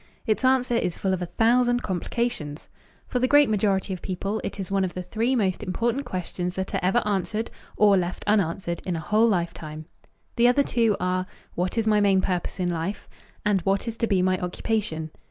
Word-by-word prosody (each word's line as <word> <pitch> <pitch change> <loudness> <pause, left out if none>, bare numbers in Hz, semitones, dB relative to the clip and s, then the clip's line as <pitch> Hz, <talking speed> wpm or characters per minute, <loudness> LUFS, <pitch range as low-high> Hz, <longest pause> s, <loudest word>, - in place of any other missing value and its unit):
Its 220 +1 0
answer 255 -1 +3
is 180 -7 0
full 190 -1 0
of 185 - -2
a 175 - -2
thousand 245 +4 +2
complications. 180 -5 -3 0.4
For 250 - -1
the 255 - +2
great 290 -3 +5
majority 195 -2 +1
of 185 - -6
people 195 +3 -3
it - - -5
is 195 0 -4
one 195 -1 +2
of 185 - -3
the 180 - -4
three 230 +8 0
most 195 -5 0
important 235 +7 -1
questions 180 -2 -4
that 190 0 -4
are - - +1
ever 190 +7 +2
answered 210 +2 -1 0.3
or 205 -2 +6
left 180 0 -2
unanswered 185 -4 0
in 180 - -2
a - - -2
whole 215 +8 +3
lifetime. 165 -5 -2 0.5
The 235 +1 +5
other 250 +3 +4
two 230 -6 +1
are 185 0 0 0.3
"What 180 +5 -2
is 225 - +2
my 210 -1 +3
main 195 -2 +4
purpose 185 0 -2
in 180 -1 0
life?" 170 +4 -3 0.4
and 205 -3 +2
"What 195 +5 0
is 230 - -3
to 230 - 0
be 190 -4 +2
my 185 0 +2
occupation?" 180 -4 -2
195 Hz, 205 wpm, -25 LUFS, 180-225 Hz, 0.5 s, or